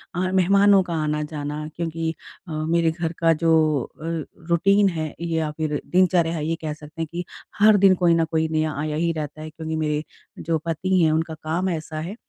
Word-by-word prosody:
आ 185 +1 0
मेहमानों 195 +1 +5
का 170 - -5
आना-जाना 150 0 -3
क्योंकि 165 -1 -2 0.3
अ, - - -8
मेरे 160 +1 +1
घर 165 0 -3
का 165 -1 +4
जो 165 +1 +2 0.5
अ, 160 - -7 0.4
रूटीन 195 +4 +4
है 155 -3 -4
या 160 -2 -1
फ़िर 155 -2 -1
दिनचर्या 175 -2 +2
है 150 - -3
ये 165 - 0
कह 155 -1 -3
सकते 150 +1 -10
हैं 165 - -2
कि 175 +1 -4 0.3
हर 210 0 +7
दिन 195 -1 +6
कोई 175 -2 +3
न 165 -1 +2
कोई 160 0 0
नया 155 0 0
आया 150 0 -2
ही 165 +2 +1
रहता 155 -1 -5
है 155 - -6
क्योंकि 160 0 -5
मेरे 150 -1 -1 0.4
जो 165 0 +1
पति 180 +3 +1
हैं 160 -2 +4
उनका 160 0 -1
काम 160 +4 -2
ऐसा 160 -2 -4
है। 180 +7 -5
165 Hz, 200 wpm, -23 LUFS, 155-175 Hz, 0.5 s, हर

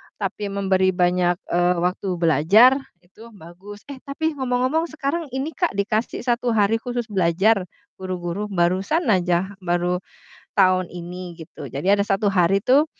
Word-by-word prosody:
tapi 205 +1 -4
memberi 190 -2 +1
banyak, 180 0 +2 0.2
eee, 175 +1 +2
waktu, 180 +2 -1
belajar 170 - +5 0.3
itu 200 +6 -16
bagus. 195 +4 -12
Eh, 270 - -9
tapi 315 +3 -1
ngomong-ngomong 260 +6 0
sekarang 315 +1 -3
ini 275 +4 -2
Kak, 350 - -1
dikasih 215 +4 -1
1 240 0 -1
hari 215 +1 +2
khusus 240 -1 -5
belajar 190 +2 +2 0.3
guru-guru 185 +1 -4
barusan 190 - 0
aja, 180 0 +1
baru 175 0 -1 0.5
tahun 185 -2 +3
ini 180 0 -7
gitu. 160 - -10
Jadi 145 +8 -2
ada 200 0 +3
1 205 +1 +1
hari 190 0 +2
tuh 270 +7 +4
195 Hz, 145 wpm, -22 LUFS, 180-230 Hz, 0.5 s, belajar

